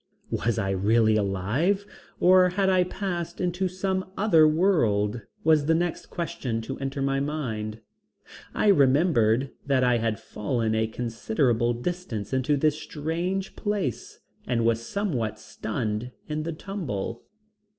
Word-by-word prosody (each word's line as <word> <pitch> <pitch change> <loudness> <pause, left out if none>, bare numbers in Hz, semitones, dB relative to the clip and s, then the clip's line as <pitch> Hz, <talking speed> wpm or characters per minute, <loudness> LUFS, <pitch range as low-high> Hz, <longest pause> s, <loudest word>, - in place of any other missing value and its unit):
Was 115 -3 0
I 95 0 0
really 110 +3 +3
alive 110 - 0 0.3
or 185 0 +6
had 190 +1 +1
I 185 -1 +4
passed 175 -3 -4
into 180 +1 0
some 185 +1 -2
other 170 -6 +5
world, 120 - +2 0.2
was 155 -2 +4
the 165 - +4
next 175 0 -2
question 165 -9 -3
to 135 +4 -6
enter 135 0 -3
my 135 0 +1
mind. 115 -7 -3 0.7
I 210 - +3
remembered 135 - +4 0.2
that 135 -2 +3
I 125 -1 +3
had 115 -2 -1
fallen 110 +1 -2
a 110 0 +1
considerable 120 +1 0
distance 125 - -4
into 130 +3 +2
this 155 +2 +1
strange 170 +5 -3
place 205 - -3 0.3
and 115 -2 +1
was 115 0 +2
somewhat 130 - -2
stunned 110 +1 -4 0.2
in 150 0 -2
the 165 +2 -3
tumble. 145 - -4
135 Hz, 135 wpm, -26 LUFS, 115-175 Hz, 0.7 s, or